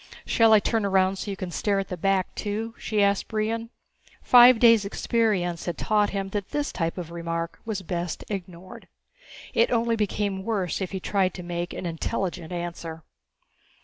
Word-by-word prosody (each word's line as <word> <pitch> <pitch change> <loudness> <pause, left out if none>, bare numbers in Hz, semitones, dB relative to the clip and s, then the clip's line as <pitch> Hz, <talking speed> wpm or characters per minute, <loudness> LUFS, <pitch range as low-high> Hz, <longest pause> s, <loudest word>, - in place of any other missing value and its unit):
"Shall 225 -1 +4
I 215 - +8
turn 225 +1 0
around 190 -1 +2
so 205 - -5
you 195 - -4
can 185 -3 -5
stare 200 +3 0
at 195 -1 -2
the 180 - -3
back 190 +1 0
too?" 220 +2 -3
she 210 -2 +1
asked 200 0 +1
Brion. 225 +1 -2 0.5
Five 245 0 +8
days' 230 -2 +6
experience 200 -4 0
had 175 - -2
taught 210 -1 +2
him 195 -1 -3
that 200 -1 -4
this 295 0 -2
type 165 0 -2
of 170 -2 -6
remark 170 0 -4
was 210 -4 -3
best 175 -1 -4
ignored. 185 -2 -8 0.7
It - - +3
only 230 -1 +1
became 205 -2 -1
worse 195 -4 -2
if 185 - -2
he 190 - -3
tried 190 -1 0
to 180 - -7
make 175 0 -4
an - - -6
intelligent 170 0 -3
answer. 170 -2 -5
195 Hz, 180 wpm, -25 LUFS, 175-215 Hz, 0.7 s, I